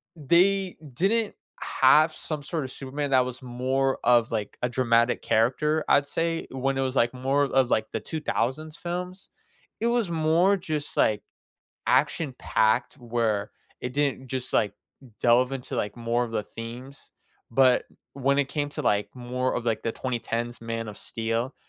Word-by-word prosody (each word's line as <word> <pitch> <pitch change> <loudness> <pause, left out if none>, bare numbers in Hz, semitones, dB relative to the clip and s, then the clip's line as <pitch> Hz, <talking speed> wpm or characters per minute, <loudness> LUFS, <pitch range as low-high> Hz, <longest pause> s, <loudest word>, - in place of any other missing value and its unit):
they 180 +5 +2 0.2
didn't 205 - +1 0.3
have 155 +4 +5
some 155 -2 -5
sort 155 +2 -3
of 130 - -6
Superman 140 +1 -4
that 130 -1 +5
was 125 0 -6
more 130 +2 0
of, 120 -1 +4
like, 110 -3 -3
a 125 - +2
dramatic 120 -1 +2
character, 150 +7 +2
I'd 140 - +4
say. 165 +2 -1
When 135 +1 -1
it - - +1
was, 130 0 -1
like, 120 0 +2
more 135 +3 +1
of, 135 -2 +2
like, 110 0 +2
the - - -2
2000s 155 0 -2
films, 180 +2 -5 0.5
it 230 - +1
was 235 -6 +1
more 165 +5 +3
just, 155 -4 -4
like, 105 -1 +2 0.6
action-packed 130 -5 +1
where 115 -4 -1 0.3
it 125 +1 -5
didn't 140 -2 0
just, 130 0 -4
like, 105 -2 +2 0.5
delve 125 +2 +4
into, 135 -2 -5
like, 105 +2 -2
more 120 +1 0
of 115 -2 -4
the 105 - 0
themes. 120 +6 -9 0.4
But 130 +1 +4 0.3
when 140 +1 +1
it 140 -1 +1
came 145 -1 -2
to, - - -4
like, 105 0 +1
more 125 +1 -2
of, 120 - -2
like, 115 -2 0
the 115 - -1
2010s 120 -1 -3
Man 115 0 -4
of 105 - -8
Steel, 115 +3 -2
130 Hz, 165 wpm, -26 LUFS, 120-150 Hz, 0.6 s, have